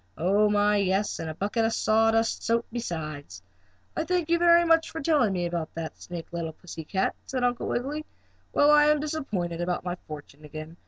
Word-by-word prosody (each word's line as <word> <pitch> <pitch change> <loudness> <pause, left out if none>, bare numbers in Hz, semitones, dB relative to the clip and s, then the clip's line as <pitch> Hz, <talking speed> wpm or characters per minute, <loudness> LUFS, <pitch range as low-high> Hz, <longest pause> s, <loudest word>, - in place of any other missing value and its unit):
Oh, 200 +5 +3
my, 205 0 +3
yes, 200 +1 0
and 165 -1 -4
a 155 - -6
bucket 210 +6 -1
of 225 0 +1
sawdust 225 +1 +2
soup 230 0 +1
besides. 155 - -5 0.5
"I 320 - 0
thank 350 -1 -1
you 340 - +4
very 345 0 +6
much 330 -1 +3
for 320 - -6
telling 290 -8 +2
me 180 -2 -1
about 170 -2 -4
that 160 -1 -5
snake, 170 -1 -8
little 165 -2 -3
pussy 165 -1 -9
cat," 190 +4 0
said 255 -2 -2
Uncle 245 -1 0
Wiggily. 290 +5 -3 0.4
"Well, 290 +1 +5
I 295 0 +6
am 300 0 +4
disappointed 215 - -3
about 180 +1 -2
my 175 - -1
fortune 150 -1 -10
again. 155 +2 -9
205 Hz, 195 wpm, -27 LUFS, 170-280 Hz, 0.5 s, very